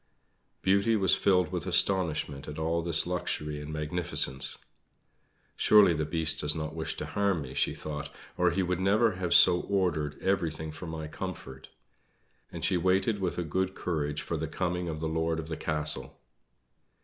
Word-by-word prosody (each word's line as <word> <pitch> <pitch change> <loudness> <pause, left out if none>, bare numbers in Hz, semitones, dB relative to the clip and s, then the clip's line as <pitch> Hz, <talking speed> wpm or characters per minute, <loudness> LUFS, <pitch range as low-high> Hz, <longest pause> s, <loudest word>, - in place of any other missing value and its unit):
Beauty 100 +4 +3
was 95 -3 +3
filled 90 -4 +2
with - - -4
astonishment 80 -7 +1
at 75 - -7
all 80 +1 0
this 85 -1 +2
luxury 75 -4 -3
and 75 +1 -7
magnificence. 75 -3 +1 1.0
"Surely 105 -4 +6
the 75 -1 -1
Beast 80 -1 0
does 75 0 +3
not 75 0 -4
wish 80 -1 -4
to - - -4
harm 100 -6 0
me," 65 -1 -9
she - - 0
thought, 75 -1 -6 0.3
"or 90 0 +3
he 95 +2 0
would 90 0 -1
never 105 +4 +3
have 90 -2 -4
so 90 0 +7
ordered 85 -7 -1
everything 80 -5 -1
for 85 +3 -8
my 80 -1 -5
comfort." 75 -6 -8 0.8
And - - -3
she 90 - +2
waited 95 +4 +1
with 95 -2 -2
a 90 - -1
good 95 +4 -2
courage 75 -4 -2
for 85 - -3
the 80 +1 -3
coming 90 +1 -2
of 80 -1 -5
the 80 - -1
Lord 80 0 -1
of 80 0 -6
the 80 - -3
Castle. 75 -1 -2
85 Hz, 175 wpm, -29 LUFS, 75-95 Hz, 1.0 s, so